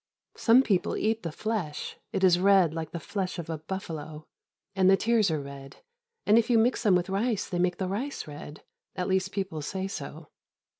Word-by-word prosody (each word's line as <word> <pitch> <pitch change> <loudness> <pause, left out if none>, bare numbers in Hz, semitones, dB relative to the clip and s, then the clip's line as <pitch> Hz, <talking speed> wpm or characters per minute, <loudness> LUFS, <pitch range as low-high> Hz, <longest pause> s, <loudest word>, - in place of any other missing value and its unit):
Some 245 +3 +5
people 195 -8 0
eat 220 +1 0
the 165 - -4
flesh, 180 -5 -3 0.2
it 195 -3 -2
is 180 -2 +5
red 190 -4 +5
like 160 -1 -4
the 170 - -5
flesh 185 +2 -3
of 165 -1 -5
a 160 - -4
buffalo; 155 -3 -6 0.5
and 190 -1 +4
the 195 - +6
tears 225 -3 +2
are 155 -2 0
red, 140 -1 -9 0.5
and 215 +2 +6
if 235 - -1
you 235 - +5
mix 235 +3 +2
them 205 -5 +4
with 175 0 +1
rice 200 +2 -1
they 175 - -3
make 180 0 +1
the 190 - -2
rice 240 +10 -3
red; 150 0 -10 0.3
at 180 - -2
least, 190 0 0
people 190 -6 -3
say 190 +6 -3
so. 155 -3 -7
185 Hz, 200 wpm, -28 LUFS, 160-205 Hz, 0.5 s, the